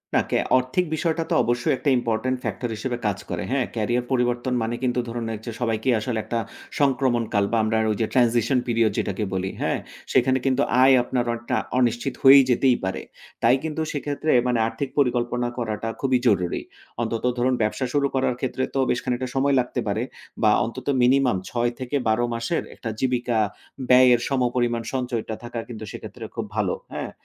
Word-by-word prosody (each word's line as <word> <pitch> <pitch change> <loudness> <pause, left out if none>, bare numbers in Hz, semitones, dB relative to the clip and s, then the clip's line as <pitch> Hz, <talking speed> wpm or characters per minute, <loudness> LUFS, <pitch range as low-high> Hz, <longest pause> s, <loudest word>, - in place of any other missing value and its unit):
না, - - +5
কে - - +2 0.2
আর্থিক 130 +8 0
বিষয়টা 165 0 0
তো - - 0
অবশ্যই 120 +2 +1
একটা 145 - 0
important 120 +2 -1
factor 120 - -3
হিসেবে 120 +2 -3
কাজ 100 -1 -1
করে। 85 -1 -3
হ্যাঁ? 130 -2 +1
ক্যারিয়ার 120 +2 0
পরিবর্তন 125 0 0
মানে 115 +1 -2
কিন্তু 125 -1 +1
ধরুন, 115 0 -4
ঐযে 110 +2 -6
সবাইকেই 115 +1 +1
আসলে 110 +1 -2
একটা 115 - -2 0.4
সংক্রমণ 130 -4 +2
কাল 100 -1 +3
বা 115 - +2
আমরা 110 0 +1
ওই - - 0
যে, - - +3
transition 120 0 +3
period 115 -2 +2
যেটাকে 100 +2 -1
বলি। 95 0 -2
হ্যাঁ? - - 0 0.3
সেখানে 130 0 +4
কিন্তু 135 +1 +2 0.2
আয় 135 0 +7
আপনার 125 -1 -1
অনেকটা 120 0 -3 0.2
অনিশ্চিত 120 +2 +1
হয়ে 135 +1 +10
যেতেই 125 0 +3
পারে। 95 0 -2 0.4
তাই 120 +2 +6
কিন্তু 160 0 -3
সেক্ষেত্রে 145 +1 -2 0.2
মানে 125 -2 +1
আর্থিক 140 +3 -4
পরিকল্পনা 120 -2 +1
করাটা 115 -2 -3
খুবই 130 -2 +2
জরুরি। 90 -5 +1 0.4
অন্তত 115 -1 -2
ধরুন, 125 +2 +2
ব্যবসা 110 +5 0
শুরু 140 -1 +2
করার 130 -2 +1
ক্ষেত্রে 130 0 -2
তো 135 - +2
বেশ 120 - +1
খানিকটা 125 +1 -2
সময় 140 +1 +2
লাগতে 125 0 -2
পারে 105 +3 0 0.4
বা 105 - +6
অন্তত 125 +3 -7
মিনিমাম 125 -3 +4
৬ 120 -1 0
থেকে 130 +3 -4
১২ 110 +2 +2
মাসের 115 +8 -1
একটা 115 - -6
জীবিকা 125 -2 0 0.5
ব্যয়ের 125 -1 +7
সমপরিমাণ 120 -3 0
সঞ্চয়টা 120 -4 -2
থাকা 120 -1 -5
কিন্তু 110 -2 -7
সেক্ষেত্রে - - -9
খুব - - -3
ভালো। - - +1 0.2
হ্যাঁ? - - -4
120 Hz, 180 wpm, -24 LUFS, 115-130 Hz, 0.5 s, হয়ে